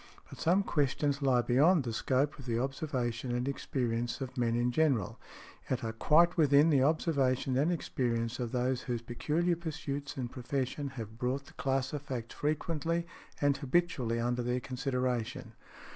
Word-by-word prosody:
But - - -10
some 185 +5 +3
questions 145 -2 0
lie 130 -3 +3
beyond 145 +7 +4
the 115 -2 -3
scope 135 +5 0
of 130 - -10
the 115 -1 0
observation 125 -2 -2
and 125 +2 -1
experience 120 -3 -2
of 130 -2 -5
men 115 -2 +1
in 120 +1 +1
general, 135 - +1 0.5
yet 130 - -1
are 115 0 -2
quite 165 +10 +4
within 150 0 +5
the 140 -3 +4
observation 135 -4 +1
and 145 +6 +2
experience 120 -7 -1
of 120 -2 -2
those 125 0 0
whose 120 -2 -3
peculiar 155 +9 0
pursuits 145 -4 -5
and 125 -2 -3
profession 135 +2 -3
have 110 0 -7
brought 130 +2 -1
that - - -18
class 135 0 0
of 145 - -3
facts 125 -5 -5
frequently 165 +2 -1 0.4
and 145 -1 +3
habitually 130 -6 0
under 120 +1 0
their 125 +1 0
consideration. 125 -2 -2
130 Hz, 160 wpm, -31 LUFS, 120-145 Hz, 0.5 s, within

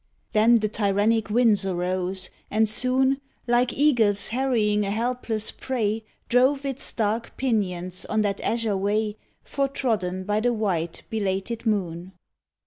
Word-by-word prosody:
Then 225 +2 +5
the 215 -2 +2
tyrannic 210 +1 +1
winds 215 -3 +3
arose, 185 0 -2 0.2
and 220 +1 +2
soon, 260 +5 +2 0.2
Like 240 0 +2
eagles 225 -9 +3
harrying 225 -5 +1
a 200 - -2
helpless 225 0 -1
prey, 225 -4 -2 0.2
Drove 265 +3 +3
its 275 -1 -2
dark 225 +1 -2
pinions 185 -8 -1
on 215 0 0
that 200 -1 -1
azure 225 -3 0
way 210 +2 0 0.3
Foretrodden 225 -10 -1
by 210 +2 0
the 240 +2 +1
white, 180 -7 -2
belated 215 +2 -2
moon. 185 -3 -2
215 Hz, 130 wpm, -25 LUFS, 200-240 Hz, 0.3 s, Then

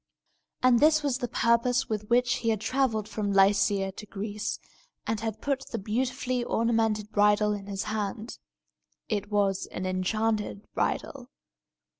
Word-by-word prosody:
And 250 -2 +5
this 310 +1 +4
was 270 -3 0
the 245 - -2
purpose 235 +2 +2
with 210 -1 -4
which 245 0 +3
he 230 - -1
had 220 -2 +1
travelled 225 -3 0
from 205 -2 -2
Lycia 195 0 +3
to 205 - -10
Greece, 205 +1 -4 0.5
and 225 - -1
had 220 -1 -4
brought 275 -1 -2
the 230 - -4
beautifully 250 +4 -1
ornamented 225 -3 0
bridle 210 0 +3
in 200 -1 -6
his 200 -1 -3
hand. 215 +1 -4 0.7
It 205 -2 -2
was 200 -2 +1
an 185 - -5
enchanted 210 +3 -1
bridle. 260 -2 -2
215 Hz, 145 wpm, -28 LUFS, 205-240 Hz, 0.7 s, And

